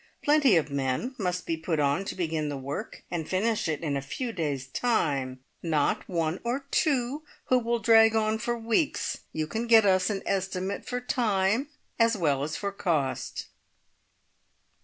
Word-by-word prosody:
Plenty 290 -7 +5
of 150 -2 0
men 140 - -1
must 180 -2 -2
be 165 - -1
put 160 0 -2
on 145 +6 +1
to - - -4
begin 160 -4 -1
the 145 - -3
work 135 +2 -6
and 165 -3 -3
finish 210 +3 0
it 155 -2 -2
in 150 -4 -1
a 140 - -1
few 235 - -4
days' 145 - -2
time, 135 - -1 0.2
not 155 -4 0
one 165 -1 -1
or 250 +4 -2
two 280 -2 +1 0.3
who 255 - +5
will 235 0 0
drag 225 0 +5
on 220 0 +1
for 240 +2 -1
weeks. 230 +6 0
You 155 -1 -2
can 225 +9 -3
get 225 -2 +7
us 185 -1 +3
an 200 -2 -2
estimate 195 0 -2
for 250 0 -2
time, 225 0 +1 0.3
as 230 -1 +4
well 145 -7 +1
as 155 +2 -3
for 200 -1 -3
cost." 160 -9 -2
190 Hz, 170 wpm, -27 LUFS, 155-230 Hz, 0.3 s, get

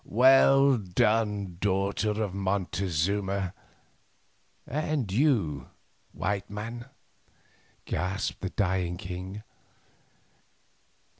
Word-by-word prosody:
"Well 135 +3 +5
done, 105 -1 0
daughter 100 +2 0
of 100 -4 -3
Montezuma, 95 0 -1 1.1
and 150 -6 -2
you, 100 - +1 0.4
white 100 +1 -2
man," 115 +4 -6 1.0
gasped 95 +1 -2
the 95 - -2
dying 90 -3 -1
king. 90 +4 -7
100 Hz, 70 wpm, -28 LUFS, 95-110 Hz, 1.1 s, Well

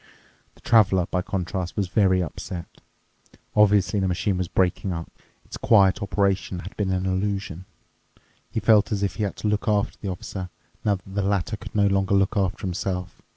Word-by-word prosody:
The - - -22
Traveler, 95 -6 +4
by 90 - +1
contrast, 95 -1 -3
was 100 -2 0
very 95 -1 +3
upset. 85 +2 -6 0.9
Obviously 105 -1 +4
the 95 - +1
machine 90 +2 0
was 90 - -1
breaking 95 +2 0
up. 85 -1 -5 0.3
Its - - -8
quiet 100 -4 +4
operation 100 -2 0
had 95 - -9
been 100 -2 -1
an 95 0 0
illusion. 95 -2 -2 0.8
He - - -2
felt 110 0 +4
as 100 -1 0
if 100 - -2
he 110 - -1
had 100 - -4
to - - -3
look 105 +2 0
after 105 -2 +1
the 100 - -3
Officer, 90 0 -5 0.3
now 105 -2 +2
that 95 - -12
the 100 - 0
latter 100 +1 0
could 100 - -11
no 105 -1 +4
longer 95 0 +2
look 100 +3 +2
after 95 -3 0
himself. 90 0 -3
95 Hz, 185 wpm, -24 LUFS, 90-100 Hz, 0.9 s, Traveler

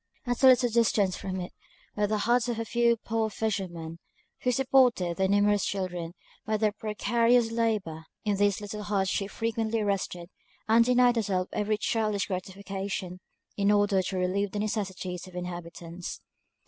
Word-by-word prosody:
At 245 0 -2
a 265 - +7
little 250 -2 +5
distance 215 -5 +2
from 190 -1 -4
it 180 - -6 0.4
were 210 0 +1
the 215 +1 0
huts 240 +3 +2
of 235 - -2
a 230 - -2
few 235 0 +2
poor 225 0 -1
fishermen, 180 -7 -3 0.4
who 250 - +1
supported 250 -9 +3
their 190 0 +2
numerous 205 0 +3
children 180 -3 -3 0.3
by 215 0 0
their 210 0 +2
precarious 230 +3 +1
labour. 210 -9 -1 0.2
In 205 -2 +1
these 205 0 +2
little 210 +1 -6
huts 200 -2 0
she 195 - -1
frequently 225 0 -1
rested, 190 -3 -2 0.4
and 225 +1 +6
denied 245 0 +4
herself 190 -4 0
every 210 0 0
childish 215 -2 0
gratification, 190 -1 -5 0.4
in 200 0 +2
order 205 -2 +3
to 185 +1 -3
relieve 190 +2 0
the - - -3
necessities 190 -4 -3
of 185 - -13
the - - -7
inhabitants. 175 -1 -7
205 Hz, 160 wpm, -28 LUFS, 185-225 Hz, 0.4 s, a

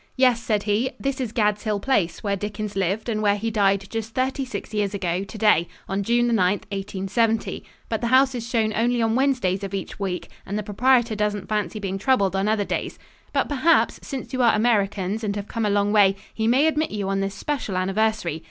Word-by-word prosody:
"Yes," 250 -3 +4
said 215 -3 0
he, 215 +5 +1
"this 275 -1 -2
is 240 -4 -3
Gad's 210 -3 +1
Hill 210 -2 -1
Place, 200 -7 0
where 200 -1 0
Dickens 210 +1 -5
lived 195 +4 -1
and 215 -2 -1
where 205 -1 +3
he 225 +2 -2
died 195 -2 +2
just 225 0 -4
thirty 265 +2 0
six 220 -4 -6
years 205 -1 0
ago 180 -1 -1
today, 210 -5 +2 0.2
on 195 +1 -1
June 235 +4 +2
9th, 200 -3 +1
1870; 200 +3 -1 0.2
but 225 -1 -2
the 235 - 0
house 265 +2 +4
is 235 -1 -5
shown 220 -3 +1
only 240 +2 +1
on 225 -1 +2
Wednesdays 250 -8 +1
of 195 0 -4
each 195 - -6
week 190 -3 -3
and 200 - -4
the 210 - -2
proprietor 235 +2 +2
doesn't 210 -2 -1
fancy 215 0 -1
being 195 -2 -3
troubled 200 -4 +2
on 195 +2 +1
other 215 -1 +1
days. - - -3 0.3
But - - +1
perhaps, 295 +4 +2
since 270 -1 -6
you 255 - 0
are 235 -3 +5
Americans 210 -2 +1
and 205 -1 -1
have 205 0 -5
come 225 -2 -1
a - - +1
long 205 0 +2
way, 200 -2 +5 0.2
he 220 0 -1
may 260 +6 +4
admit 315 0 +1
you 205 -2 -3
on 195 0 0
this 195 0 -2
special 255 -7 -3
anniversary. 195 -3 0
210 Hz, 215 wpm, -23 LUFS, 195-235 Hz, 0.3 s, are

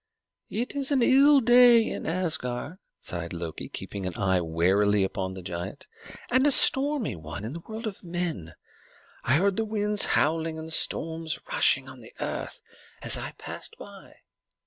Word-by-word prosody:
"It 245 +5 -3
is 280 0 0
an 265 -4 +3
ill 275 +2 +6
day 240 -1 +6
in - - -5
Asgard," 160 -3 -2 0.2
sighed 85 -1 -5
Loki, 85 -2 -6
keeping 100 -2 -6
his 90 -2 -4
eye 95 -2 +1
warily 95 +5 +2
upon 95 0 -3
the 95 - -9
giant, 85 0 -6 0.5
"and 260 +3 +4
a - - +6
stormy 280 - +4
one 80 +5 -8
in 115 - -5
the 170 - -6
world 220 +6 -8
of 210 -3 -6
men. 170 - -4 0.7
I 125 - +2
heard 195 +4 +1
the 225 - +1
winds 210 -1 +1
howling 160 +1 0
and 160 0 -7
the - - -10
storms 160 0 -1
rushing 135 0 +3
on 130 -1 -11
the 110 - -15
earth - - -5 0.4
as - - +4
I - - -5
passed - - -9
by. - - -13
160 Hz, 170 wpm, -26 LUFS, -, 0.7 s, ill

